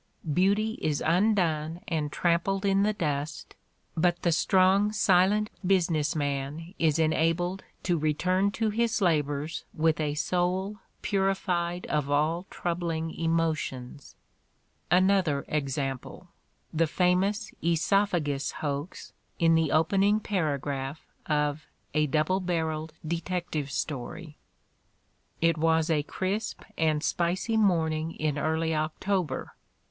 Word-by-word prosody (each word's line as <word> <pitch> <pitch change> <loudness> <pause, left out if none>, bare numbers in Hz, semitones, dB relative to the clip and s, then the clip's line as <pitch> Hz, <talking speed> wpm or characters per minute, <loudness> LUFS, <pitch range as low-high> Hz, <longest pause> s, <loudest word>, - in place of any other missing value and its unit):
Beauty 205 +6 +2
is 150 -2 0
undone 170 -3 +1
and 155 -3 -1
trampled 180 +5 +1
in 195 0 +3
the 210 +1 +3
dust, 150 -6 -3 0.4
but 175 +1 +1
the 170 - +3
strong, 190 +5 +3
silent 205 +1 +3
business 165 -5 +2
man 145 +3 -3
is 160 -2 +3
enabled 165 +3 +1 0.2
to 175 -3 +1
return 180 +6 +1
to 220 +1 -1
his 230 +2 +1
labors 150 -3 0
with 160 0 +2
a 150 -1 -1
soul 185 +5 0 0.3
purified 185 -3 0
of 150 -2 -1
all 155 +5 +1
troubling 170 -2 -2
emotions. 155 -5 -2 0.7
Another 180 -6 +3
example, 140 +3 -3 0.4
the 165 +1 +2
famous 190 +6 +1
"oesophagus" 170 -4 +1
hoax 145 +3 -5 0.2
in 165 -2 +4
the 160 -2 +2
opening 195 +6 +3
paragraph 145 -7 -2 0.2
of 150 0 0 0.3
"A 150 0 +2
Double 155 +6 +1
Barrelled 160 -3 -2
Detec 175 +2 -3
tive 145 -3 -2
Story": 150 +3 -5 1.1
It 165 -1 +3
was 160 0 +2
a 150 -2 +3
crisp 195 +8 -3
and 155 -1 +1
spicy 180 +8 0
morning 165 -6 +1
in 150 -2 -1
early 160 +1 0
October. 155 0 -2
165 Hz, 110 wpm, -28 LUFS, 155-185 Hz, 1.1 s, in